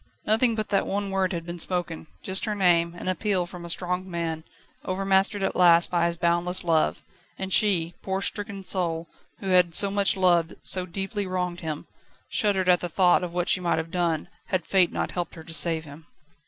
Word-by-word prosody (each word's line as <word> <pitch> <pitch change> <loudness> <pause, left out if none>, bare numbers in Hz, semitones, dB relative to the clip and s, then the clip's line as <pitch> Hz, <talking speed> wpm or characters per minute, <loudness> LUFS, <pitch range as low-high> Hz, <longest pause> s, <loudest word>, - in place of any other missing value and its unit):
Nothing 225 +2 +3
but 215 -1 -3
that 200 - +1
one 200 0 -2
word 190 -1 0
had 170 -2 -4
been 170 0 -7
spoken 175 -3 +2 0.2
just 190 +1 +1
her 210 -2 -2
name, 170 -3 +2
an 175 - -8
appeal 185 0 0
from 175 -1 -10
a 170 - -7
strong 180 +2 -2
man, 165 -2 -3 0.4
overmastered 195 +1 +1
at - - -1
last 170 -1 +6
by 170 -1 +2
his 170 0 -3
boundless 175 +2 0
love 165 -2 +1 0.3
and 190 -1 -3
she, 175 -5 +3
poor, 190 0 -2
stricken 200 0 -3
soul, 170 -3 -2 0.3
who 195 - -4
had 180 -3 +3
so 200 -1 +5
much 200 0 +2
loved, 175 -3 +2
so 185 -1 +1
deeply 195 +3 -4
wronged 180 -1 -3
him, 155 -3 -5 0.4
shuddered 200 -5 0
at 180 -1 +5
the 175 - -4
thought 180 +1 +3
of 175 -1 -6
what 175 -1 -1
she - - +3
might 175 -3 0
have 160 0 -4
done, 170 -3 -1 0.2
had 185 -4 -2
Fate 185 -3 +3
not - - -3
helped 175 -2 -4
her 160 - -10
to 165 - -10
save 165 -1 +1
him. 150 +3 -13
180 Hz, 205 wpm, -25 LUFS, 170-195 Hz, 0.4 s, last